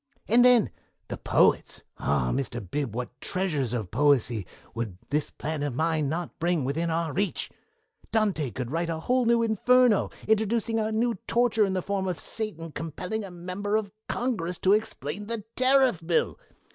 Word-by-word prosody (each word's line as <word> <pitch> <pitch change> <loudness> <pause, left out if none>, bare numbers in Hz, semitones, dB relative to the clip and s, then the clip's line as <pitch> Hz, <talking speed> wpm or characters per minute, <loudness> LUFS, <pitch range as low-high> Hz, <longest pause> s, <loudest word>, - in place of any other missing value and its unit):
"And 240 +3 +6
then 245 -4 +6 0.4
the - - -4
poets - - +2 0.2
ah, 60 - +1
Mr. 130 -3 -2
Bib, 140 -7 -2
what 125 0 -5
treasures 160 - -1
of 110 -7 -3
poesy 125 -7 +2 0.3
would 115 -6 -4
this 150 0 0
plan 155 -1 -4
of 145 -4 -2
mine 155 -1 +1
not 170 +2 -4
bring 170 -4 +1
within 160 +5 -1
our 165 -2 -1
reach! 200 +1 -1 0.6
Dante 200 - +1
could 120 +3 -5
write 170 +1 -1
a 160 -1 -3
new 235 -2 +3
'Inferno' 235 +1 +4 0.2
introducing 220 +1 +1
a 220 0 0
new 225 -2 0
torture 230 -3 +3
in 190 - -2
the 185 -2 -1
form 195 -1 -1
of 180 -3 -2
Satan 165 -8 -4
compelling 180 +8 -4
a 195 - -7
Member 185 +4 -3
of 215 -2 -1 0.2
Congress 190 -9 -1
to 190 - +3
explain 205 -3 -2
the 230 -2 -3
Tariff 260 -7 +4
bill. 165 0 0
180 Hz, 165 wpm, -27 LUFS, 150-220 Hz, 0.6 s, And